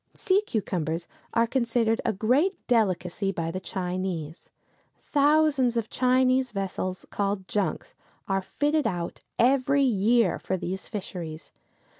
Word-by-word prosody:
Sea 395 -2 +2
cucumbers 175 - -2 0.3
are 230 0 +4
considered 235 -2 +1
a - - +1
great 255 - +2
delicacy 195 -4 +1
by 165 -3 -3
the 185 - -4
Chinese. 180 -4 -4 0.5
Thousands 290 -4 +3
of 230 -2 -2
Chinese 255 0 +3
vessels, 190 -3 -3
called 200 -2 -2
junks, 210 - -2 0.3
are 195 -1 +1
fitted 290 +8 0
out 175 -5 -3 0.2
every 275 +3 +3
year 230 -3 +3
for 190 - -2
these 185 +2 -5
fisheries. 170 -6 -6
215 Hz, 120 wpm, -26 LUFS, 185-255 Hz, 0.5 s, are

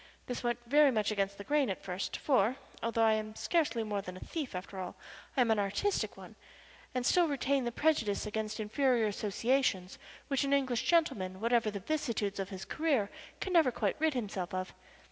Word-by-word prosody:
This 245 - -4
went 240 -1 +1
very 290 +4 +6
much 215 -4 +1
against 200 -1 -1
the 200 - -7
grain 290 +1 +2
at 190 - -4
first, 185 0 -3
for, 250 -4 +2 0.3
although 230 0 +1
I 220 -1 +5
am 215 0 -3
scarcely 300 -8 +1
more 205 -2 -2
than 185 -1 -8
a - - -9
thief 290 - -5
after 190 +1 -6
all, 180 -1 -5 0.4
I - - +5
am 235 -2 +3
an 220 - +3
artistic 205 - 0
one, - - -11 0.6
and 250 -1 0
still 350 +4 +4
retain 275 -2 0
the 240 - -1
prejudice 235 -9 +1
against 215 0 -3
inferior 235 +2 +2
associations 210 -1 0 0.3
which 275 0 +1
an 280 0 +1
English 260 -4 +1
gentleman 215 - +1
whatever 230 0 +2
the 205 -1 -4
vicissitudes 230 -8 -1
of 195 0 -3
his 190 -1 -7
career 275 -11 0 0.3
can 375 - -3
never 320 -7 +5
quite - - 0
rid 315 -2 +2
himself 195 -5 -3
of. 185 0 -3
230 Hz, 195 wpm, -32 LUFS, 200-275 Hz, 0.6 s, very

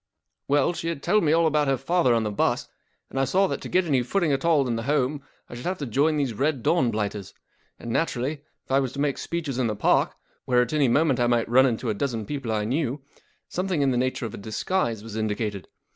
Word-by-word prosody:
44 145 - +3
W 145 - +4
ell, - - 0
she 165 - -5
had 165 -4 -3
told 210 +3 +3
me 150 - +3
all 165 +1 +4
about 150 -2 +2
her 135 -1 +2
father 135 -1 +2
on 115 - +1
the 105 - -2
bus, 100 - 0 0.4
and 135 - -2
I - - +3
saw' 185 +9 +2
that - - -3
to - - -7
get 185 0 +2
any 140 -6 +2
footing 165 +5 0
at 135 -1 0
all 155 -5 +3
in 120 - -1
the 115 - -2
home 145 +2 0 0.3
I - - -11
should 120 +6 -6
have 185 0 -1
to 145 - -4
join 145 +6 +1
these 135 -5 0
Red 135 +1 -1
Dawn 135 -8 +3
blighters; 105 -3 -3 0.4
and 120 - -7
naturally, 140 0 -1 0.2
if - - -11
I 135 - +4
was 130 -3 -2
to 140 - -7
make 145 -1 0
speeches 155 -7 -3
in 125 - +2
the 110 - -2
Park, - - +2 0.3
where 125 -1 +3
at 120 - -6
anv 145 -4 +2
moment 140 0 +2
I 120 - +3
might 120 -1 +1
run 130 +3 +5
into 115 -1 -1
a - - 0
dozen 115 -1 -2
people 135 -2 -4
I 105 -1 0
knew, 135 +3 -1 0.5
something 180 -5 -1
in 135 - +2
the - - 0
nature 125 0 -1
of 110 - -6
a - - -6
disguise 110 - -2
was 110 -1 -8
indicated. 105 -2 -2
135 Hz, 260 wpm, -25 LUFS, 115-150 Hz, 0.5 s, run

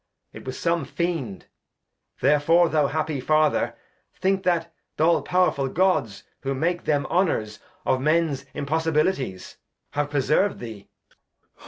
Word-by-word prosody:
It - - -11
was 130 0 -5
some 170 -2 0
Fiend, 145 - -3 0.8
therefore 150 +5 +4
thou 150 -3 +2
happy 155 -1 -2
Father, 155 +3 +2 0.4
Think 190 0 +1
that 170 -2 +1 0.2
th' - - -2
all 165 +1 +4
powerfull 180 -7 +1
Gods, 155 - +1 0.2
who 135 0 -2
made 170 +5 -1
them 145 -2 +1
Honours 160 - 0 0.3
Of 130 - +1
Mens 155 -2 +1
Impossibilities, 150 - -1 0.3
have 145 0 -1
preserv'd 150 +7 +1
thee. 110 -4 -9
155 Hz, 125 wpm, -24 LUFS, 135-170 Hz, 0.8 s, therefore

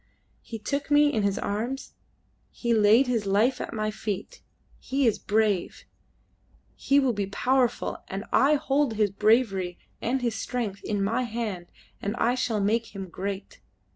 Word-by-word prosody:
He 225 - -7
took 280 +7 -3
me 290 0 +5
in 220 - +1
his 200 -1 0
arms, 235 +7 -3 0.6
he 235 -1 -1
laid 220 +4 +5
his 230 -5 -1
life 220 +7 +2
at - - -5
my 215 -1 -2
feet. 210 -2 -5 0.4
He 270 +1 0
is 225 - +2
brave; 210 -3 0 0.9
he 280 +1 +3
will 265 -3 +2
be 200 -2 -2
powerful, 250 +4 0
and 195 +3 -5
I 285 +3 +5
hold 275 -3 +1
his 210 -2 +2
bravery 200 -4 +2 0.2
and 250 +2 -1
his 235 -2 +1
strength 220 -3 -3
in 205 -2 -1
my 225 +5 +1
hand, 220 -7 -4 0.3
and 205 +3 -2
I 240 0 +2
shall 245 -4 0
make 220 +2 0
him 190 -2 -6
great. 195 +2 -6
220 Hz, 160 wpm, -26 LUFS, 200-250 Hz, 0.9 s, me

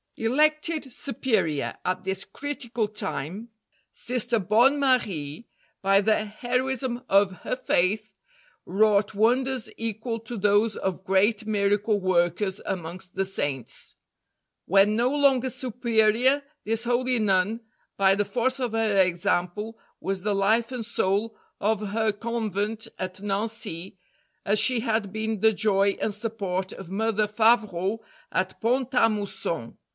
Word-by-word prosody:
Elected 305 +4 +1
Superior 220 - -1
at 185 - -1
this 190 0 -2
critical 245 -6 -3
time, 205 0 -4 0.4
Sister 240 -1 0
Bonne 235 +9 +4
Marie, 215 - 0 0.3
by 195 0 +4
the 215 +1 +2
heroism 250 +3 -2
of 195 0 +4
her - - -1
faith, 210 -2 0 0.5
wrought 210 +1 +2
wonders 250 +4 +1
equal 225 +1 -3
to 230 +1 -7
those 205 +2 +3
of 190 -1 -3
great 205 +3 +2
miracle 205 0 +1
workers 185 +1 +1
amongst 180 +1 -5
the 195 - 0
Saints. 145 -9 -3 0.7
When 195 +3 +4
no 240 +3 +2
longer 270 -2 +3
Superior, 245 +1 +2 0.2
this 225 +1 0
holy 245 +1 +1
Nun, 205 +1 +1 0.4
by 195 -1 +5
the 205 +1 0
force 250 +6 -1
of 245 -3 -2
her 220 -3 +1
example, 185 +4 +1 0.2
was 195 -1 -3
the 205 +1 0
life 220 +5 +2
and 245 -3 -4
soul 215 0 0 0.2
of 210 0 0
her 220 +1 +1
Convent 220 -1 -3
at 185 0 -5
Nancy, 205 -3 -3 0.5
as 205 +1 +3
she 255 -2 +3
had 220 -4 -1
been 220 0 -2
the 220 +2 +4
joy 200 -1 +2
and 215 - 0
support 200 -4 -3
of 190 -2 -10
Mother 215 +1 +1
Favrot 215 -2 +2 0.3
at 185 0 -1
Pont 250 +2 +1
a 235 -3 +5
Mousson. 195 - -4
215 Hz, 130 wpm, -26 LUFS, 195-235 Hz, 0.7 s, by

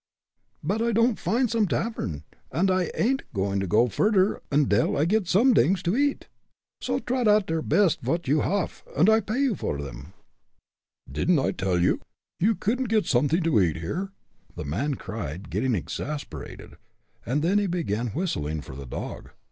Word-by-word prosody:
"But 200 +9 0
I 235 0 +1
don'd 230 +1 +2
find 245 +3 +1
some 225 -2 +1
tavern, 95 - -2 0.3
und 190 +3 +2
I 185 -1 +1
ain'd 265 +4 +1
going 100 0 0
no 105 +5 +3
furder 200 - +2
ondil 135 -6 +2
I 150 - +3
get 205 +1 +1
somedings 195 - +4
to 175 +4 +1
eat. 285 +1 0 0.5
So - - -1
trot 250 -2 -1
oud 210 -1 +5
der 165 -2 -1
best 190 -1 +2
vot 165 -2 -2
you 145 +2 +3
haff, 200 -3 -2
und 180 +9 +5
I 220 - +5
pay 240 +4 0
for 75 - -3
'em." 70 +3 -8 0.9
"Didn't 115 - +1
I 135 - +1
tell 95 -2 -1
you, 85 +1 +2 0.4
you 215 +5 +3
couldn't 235 +6 -1
get 215 -4 +2
something 145 +7 +2
to 155 -11 +3
eat 85 -4 +1
here?" 180 - -4 0.4
the 80 - -6
man 125 - -1
cried, 95 - -6
getting 130 -3 +1
exasperated. 145 - -6 0.5
Then 160 - +1
he 205 - 0
began 125 - -1
whistling 80 - -2
for 65 - -10
the 70 -1 -8
dog. - - -6
165 Hz, 165 wpm, -26 LUFS, -, 0.9 s, oud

